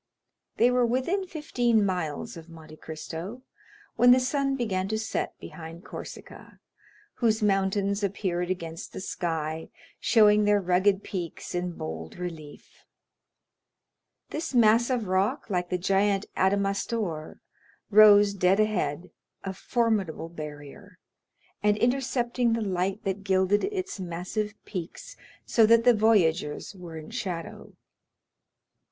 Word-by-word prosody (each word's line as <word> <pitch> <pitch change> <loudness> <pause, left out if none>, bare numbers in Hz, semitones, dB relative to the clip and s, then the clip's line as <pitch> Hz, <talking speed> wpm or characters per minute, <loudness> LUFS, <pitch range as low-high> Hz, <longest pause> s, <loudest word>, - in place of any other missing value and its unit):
They 240 +2 +4
were 250 0 +3
within 260 +12 0
fifteen 245 -10 +1
miles 175 -6 -3
of 165 0 -11
Monte 155 -1 -13
Cristo 165 +10 -7 0.5
when 245 +2 +6
the 250 +1 +8
sun 275 +2 0
began 195 -7 -1
to 220 +2 -1
set 220 0 -3
behind 165 +2 -10
Corsica, - - -10 0.6
whose 220 -2 +1
mountains 200 0 +1
appeared 180 -3 -1
against 165 -3 -5
the - - -6
sky, 160 -4 -3 0.3
showing 210 -2 +5
their 205 0 +4
rugged 190 +2 +2
peaks 175 -5 -6
in 175 0 -2
bold 80 - -7
relief; 160 -5 -9 1.5
this 310 -3 -4
mass 230 +1 +5
of 245 -4 0
rock, 200 +8 0
like 180 -1 -1
the 180 - 0
giant 195 +2 +1
Adamastor, 195 -3 -1 0.5
rose 205 -1 +7
dead 190 +1 +2
ahead, 185 -6 -1 0.3
a 195 - -4
formidable 200 -7 -1
barrier, 155 +5 -10 0.6
and 210 0 +3
intercepting 245 -1 +1
the 230 - 0
light 190 0 -1
that 195 0 -3
gilded 190 +1 +2
its 390 - -4
massive 185 +4 -4
peaks 210 - -7 0.3
so 225 -2 +4
that 230 +1 +5
the 245 - +6
voyagers 185 -10 +2
were 175 -4 -9
in 155 -1 -9
shadow. 170 -3 -6
195 Hz, 120 wpm, -27 LUFS, 175-225 Hz, 1.5 s, the